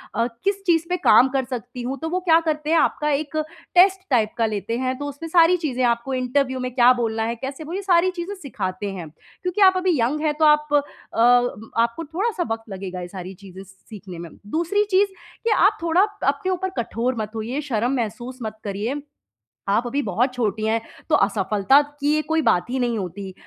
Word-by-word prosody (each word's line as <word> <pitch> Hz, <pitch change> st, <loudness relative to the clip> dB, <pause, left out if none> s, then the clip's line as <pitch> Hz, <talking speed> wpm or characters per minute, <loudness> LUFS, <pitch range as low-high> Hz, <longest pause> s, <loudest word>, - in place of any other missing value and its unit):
अ, 230 Hz, +2 st, +1 dB, 0.2 s
किस 395 Hz, 0 st, 0 dB
चीज़ 335 Hz, -2 st, +3 dB
पे 360 Hz, -, +1 dB
काम 255 Hz, -5 st, +5 dB
कर 270 Hz, -1 st, +1 dB
सकती 250 Hz, 0 st, -6 dB
हूँ? 260 Hz, +3 st, -3 dB
तो 320 Hz, -, -2 dB
वो 365 Hz, +2 st, 0 dB
क्या 335 Hz, -3 st, +4 dB
करते 305 Hz, 0 st, -1 dB
हैं, 330 Hz, -, +4 dB
आपका 300 Hz, -1 st, +1 dB
एक 295 Hz, +1 st, -1 dB, 0.4 s
टेस्ट 380 Hz, +1 st, +5 dB
टाइप 225 Hz, -5 st, +2 dB
का 230 Hz, -, +2 dB
लेते 215 Hz, +1 st, -2 dB
हैं, 255 Hz, 0 st, -1 dB
तो 290 Hz, -, -4 dB
उसमें 285 Hz, +4 st, -8 dB
सारी 340 Hz, +1 st, +5 dB
चीज़ें, 265 Hz, -7 st, -2 dB
आपको 235 Hz, +2 st, 0 dB
इंटरव्यू 260 Hz, +1 st, 0 dB
में 255 Hz, 0 st, -3 dB
क्या 245 Hz, -1 st, +7 dB
बोलना 225 Hz, -1 st, -1 dB
है, 230 Hz, +1 st, -2 dB
कैसे 270 Hz, +5 st, -6 dB
बोल 325 Hz, +4 st, -6 dB
ये 395 Hz, -, -2 dB
सारी 370 Hz, -1 st, +3 dB
चीज़ें 360 Hz, +3 st, -5 dB
सिखाते 200 Hz, -, -4 dB
हैं। 175 Hz, -5 st, -7 dB
क्योंकि 360 Hz, -, -6 dB
आप 375 Hz, -1 st, +7 dB
अभी 365 Hz, -7 st, +1 dB
यंग 265 Hz, +7 st, 0 dB
हैं, 305 Hz, -1 st, +1 dB
तो 310 Hz, +1 st, +2 dB
आप 300 Hz, 0 st, -9 dB, 0.4 s
अ, 245 Hz, +1 st, +4 dB, 0.3 s
आपको 235 Hz, +7 st, -1 dB
थोड़ा-सा 365 Hz, +5 st, -1 dB
वक़्त 225 Hz, 0 st, -3 dB
लगेगा 185 Hz, -2 st, -6 dB
ये 175 Hz, -, -6 dB
सारी 185 Hz, 0 st, -8 dB
चीज़ें 190 Hz, 0 st, -12 dB
सीखने 190 Hz, -1 st, -12 dB
में। 170 Hz, 0 st, -7 dB, 0.2 s
दूसरी 345 Hz, -, +1 dB
चीज़ 390 Hz, +2 st, +4 dB, 0.4 s
कि 465 Hz, -, +1 dB
आप 420 Hz, 0 st, +4 dB
थोड़ा 335 Hz, +2 st, +3 dB, 0.3 s
अपने 280 Hz, +7 st, 0 dB
ऊपर 375 Hz, +1 st, -1 dB
कठोर 240 Hz, +2 st, -1 dB
मत 215 Hz, -1 st, -4 dB
होइए, 240 Hz, +7 st, -3 dB
शर्म 240 Hz, -2 st, 0 dB
महसूस 240 Hz, +2 st, -4 dB
मत 220 Hz, 0 st, -6 dB
करिए। 215 Hz, +8 st, -3 dB, 0.7 s
आप 225 Hz, +5 st, +2 dB
अभी 280 Hz, +4 st, -1 dB
बहुत 245 Hz, +3 st, 0 dB
छोटी 220 Hz, -3 st, -1 dB
हैं, 220 Hz, +1 st, +1 dB, 0.3 s
तो 305 Hz, -, +5 dB
असफलता 205 Hz, +4 st, +3 dB, 0.2 s
की 300 Hz, +2 st, +2 dB
कोई 320 Hz, 0 st, +2 dB
बात 180 Hz, -, +2 dB
ही 260 Hz, +1 st, -1 dB
नहीं 240 Hz, -2 st, 0 dB
होती। 190 Hz, 0 st, -6 dB
255 Hz, 205 wpm, -22 LUFS, 220-325 Hz, 0.7 s, क्या